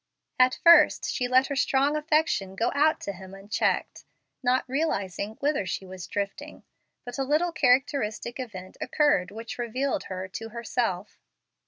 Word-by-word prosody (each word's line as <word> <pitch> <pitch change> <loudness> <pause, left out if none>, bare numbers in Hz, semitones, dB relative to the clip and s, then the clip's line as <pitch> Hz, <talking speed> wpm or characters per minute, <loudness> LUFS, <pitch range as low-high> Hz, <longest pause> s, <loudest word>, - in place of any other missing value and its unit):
At 255 0 +4
first 335 -3 +6
she 250 - -1
let 255 +1 +4
her 280 - -4
strong 275 +2 +2
affection 305 - 0
go 230 +5 0
out 305 +2 +3
to 200 - -4
him 190 +1 -11
unchecked, 200 +2 -1 0.4
not 255 0 +1
realizing 215 - -2
whither 285 -5 +1
she 185 +1 -4
was 185 -1 -9
drifting; 200 -1 -5 0.4
but 245 +2 -7
a - - +1
little 305 +6 +1
characteristic 255 -4 +1
event 190 -7 -8
occurred 290 -12 +2
which 225 +4 -8
revealed 250 +4 -2
her 185 0 -5
to 225 +4 -7
herself. 230 -4 -3
245 Hz, 150 wpm, -26 LUFS, 200-280 Hz, 0.4 s, first